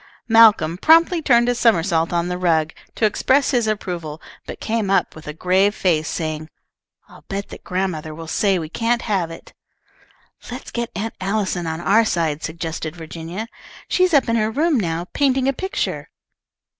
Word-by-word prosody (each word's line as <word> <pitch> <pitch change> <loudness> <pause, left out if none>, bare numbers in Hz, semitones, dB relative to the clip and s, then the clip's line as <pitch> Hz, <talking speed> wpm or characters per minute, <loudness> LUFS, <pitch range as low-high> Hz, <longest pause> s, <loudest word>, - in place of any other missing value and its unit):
'" - - -41
Malcolm 215 -8 +5
promptly 330 - +5
turned 240 -5 +4
a 245 - +3
somersault 170 -8 +2
on 170 0 0
the 180 0 -3
rug, 160 -3 +1 0.2
to 225 - +1
express 265 +6 +2
his 240 -4 +1
approval, 175 -7 -4 0.3
but - - -7
came 220 -3 -1
up 195 - +1
with 155 - -12
a - - -3
grave 185 +6 +2
face, 160 -4 +1
saying, 155 -1 -4 0.6
"I'll - - -16
bet 200 0 -4
that - - -11
grandmother 180 -5 -3
will 165 +1 -8
say 195 +4 +1
we 160 -3 -4
can't 230 +7 -1
have 190 -6 -1
it." 165 - -12 1.0
"Let's 245 +2 -8
get 235 -1 -3
Aunt 220 +3 -3
Allison 190 -3 -1
on 160 0 -3
our 210 +6 +4
side," 160 -7 -1
suggested 160 -1 -5
Virginia. 165 +5 -7 0.4
"She's 365 0 +2
up 275 - +4
in 230 0 +1
her 215 -1 +1
room 295 +3 +1
now, 170 -3 -2
painting 265 -2 +2
a 275 - +2
picture." 380 +9 -3
190 Hz, 175 wpm, -21 LUFS, 165-230 Hz, 1.0 s, Malcolm